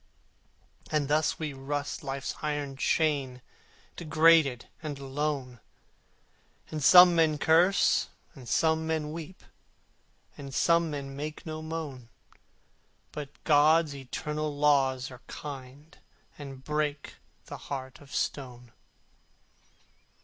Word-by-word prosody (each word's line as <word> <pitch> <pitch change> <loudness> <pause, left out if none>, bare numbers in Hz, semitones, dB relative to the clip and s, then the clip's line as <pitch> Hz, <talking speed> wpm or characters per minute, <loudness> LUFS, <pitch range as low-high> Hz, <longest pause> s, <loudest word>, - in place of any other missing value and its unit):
And 150 -2 0
thus 150 +1 +1
we 155 -3 -4
rust 145 +2 -4
Life's 135 0 -4
iron 145 -2 -3
chain 140 -3 0 0.6
Degraded 160 -5 +3
and 150 -3 -5
alone: 135 -2 -3 1.1
And 155 -2 -4
some 180 +4 +9
men 160 -2 +3
curse, 170 +6 +3 0.2
and 125 -4 -11
some 160 0 +2
men 155 -2 -2
weep, 165 +3 -9 0.9
And 135 -1 -9
some 170 +1 +3
men 140 -2 -6
make 150 +2 -6
no 155 -1 -5
moan: 155 -7 -6 1.0
But 145 -2 -6
God's 155 +1 +4
eternal 150 +2 -4
Laws 135 -3 +2
are 125 0 -12
kind 145 +2 -9 0.4
And 135 -2 -10
break 150 -1 -3 0.3
the - - -8
heart 130 -1 -6
of 140 -1 -16
stone. 125 -3 -4
145 Hz, 105 wpm, -28 LUFS, 135-155 Hz, 1.1 s, some